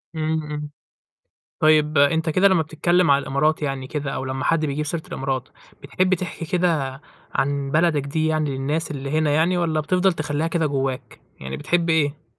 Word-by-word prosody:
إمم، 155 0 -1
إمم. 150 0 -5 0.9
طيب 155 -1 +4
أنت 160 +3 +3
كده 185 +5 +4
لمّا 190 -4 +3
بتتكلم 165 +1 +2
على 140 0 +4
الإمارات 150 +4 0
يعني 135 -2 -3
كده، 145 -1 -3
أو - - -4
لمّا 130 +1 -3
حد 160 -2 +2
بيجيب 150 +1 -2
سيرة 160 +2 -2
الإمارات، 130 -1 -3 0.3
بتحب 185 0 +1
تحكي 170 -2 -4
كده 155 -6 0 0.3
عن 140 +1 0
بلدك 155 -2 +2
دي 155 +3 -1
يعني 155 -2 0
للناس 150 +5 -2
اللي 140 -1 -5
هنا 155 0 +1
يعني، 165 +4 +2
والَّا 165 -3 0
بتفضَل 185 +4 +2
تخلّيها 150 0 -2
كده 165 -1 0
جواك، 135 -2 -3 0.2
يعني 65 0 -6
بتحب 170 -1 0
إيه؟ 155 -1 +1
155 Hz, 175 wpm, -22 LUFS, 140-165 Hz, 0.9 s, طيب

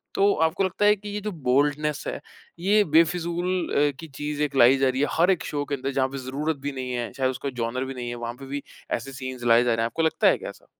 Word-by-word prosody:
तो 200 +1 +4
आपको 175 +4 -1
लगता 190 +2 0
है 210 0 +6
कि 205 0 -9
ये 205 0 -4
जो 210 +1 -3 0.2
बोल्डनेस 145 +3 +1
है, - - -3 0.4
ये 205 +4 +4
बेफिज़ूल 175 +2 +1 0.2
अ, - - 0
की 165 - -8
चीज़ 150 0 -5
एक 145 -2 -2
लाई 130 +1 +6
जा 135 0 +3
रही 130 +1 -1
है, 145 - +3
हर 175 +3 +5
एक 185 - 0
शो 145 -1 -2
के 145 - -2
अंदर, 135 0 -3
जहाँ 130 -1 +1
पे 135 - -6
ज़रूरत 150 +5 -2
भी - - -1
नहीं 130 -2 -5
है, 120 -1 -3
चाहे 130 -1 0
उसका 130 +2 -3
जॉनर 120 +3 -2
भी 135 - -5
नहीं 125 -2 -5
है, 120 - -4
वहाँ 120 0 -5
पे 135 - -9
भी 140 +1 -5 0.3
ऐसे 135 +4 -2
सीन्स 130 -2 -6
लाए 120 0 +5
जा 120 -1 +2
रहे 115 - 0
हैं। - - +2
आपको 140 +8 -2
लगता 160 - +3
है - - +4
क्या - - -7
ऐसा? - - -14
140 Hz, 280 wpm, -25 LUFS, 130-165 Hz, 0.4 s, है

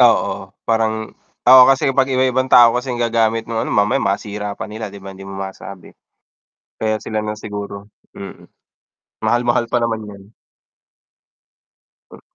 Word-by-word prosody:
Oo, - - +2
parang 110 -1 -1 0.3
oo, 130 +1 +9
kasi 135 0 +3
kapag 135 0 +1
iba-ibang 130 0 +1
tao 120 -2 +7
kasi 125 +2 -3
ang 120 - -2
gagamit 115 -1 +1
no'ng 115 0 -3
ano, - - -4
mamaya 100 0 +2
masira 105 +1 -3
pa - - -5
nila, 110 0 -7
'di 100 0 -11
ba, 95 0 -8
hindi 95 0 -12
mo 95 - -8
masabi. 95 -1 -8 0.9
Kaya 110 -1 -1
sila 110 - -3
lang 105 0 -3
siguro, 100 -1 -7 0.2
mm. 100 - -10 0.8
Mahal-mahal 120 0 +1
pa 120 - +2
naman 115 -2 -2
yan. 100 +1 -14 1.8
Hmm. - - -14
110 Hz, 150 wpm, -18 LUFS, 100-120 Hz, 1.8 s, oo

